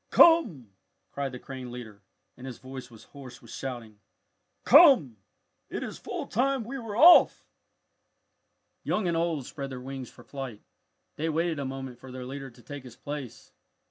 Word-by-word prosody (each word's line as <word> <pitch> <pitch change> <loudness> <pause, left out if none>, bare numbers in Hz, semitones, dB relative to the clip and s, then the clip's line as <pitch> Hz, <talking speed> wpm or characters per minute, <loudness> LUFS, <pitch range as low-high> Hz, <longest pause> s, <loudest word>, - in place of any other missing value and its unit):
come!" 220 - +5 0.4
cried 140 -1 -3
the 125 - -7
crane 130 -1 -8
leader, 110 -5 -9 0.3
and 130 - -10
his 125 - -7
voice 130 -1 -9
was 115 -2 -15
hoarse 130 -4 -11
with 115 - -15
shouting. 120 -5 -7 0.6
"Come! 265 - +7 0.5
It - - -4
is - - -7
full - - -5
time 265 +2 0
we 270 +5 -6
were 225 -3 -6
off!" 340 +7 +7 1.4
Young 210 -4 0
and 170 - 0
old 165 -5 -1
spread 140 0 -6
their 130 -1 -7
wings 130 -1 -7
for - - -16
flight. 135 -6 -8 0.5
They 160 +2 -1
waited 165 0 0
a 140 - -3
moment 130 -2 -6
for 130 - -11
their 130 0 -7
leader 135 +1 -7
to 120 -1 -19
take 145 -2 -8
his 125 -2 -12
place. 145 -5 -8
135 Hz, 170 wpm, -28 LUFS, 125-165 Hz, 1.4 s, Come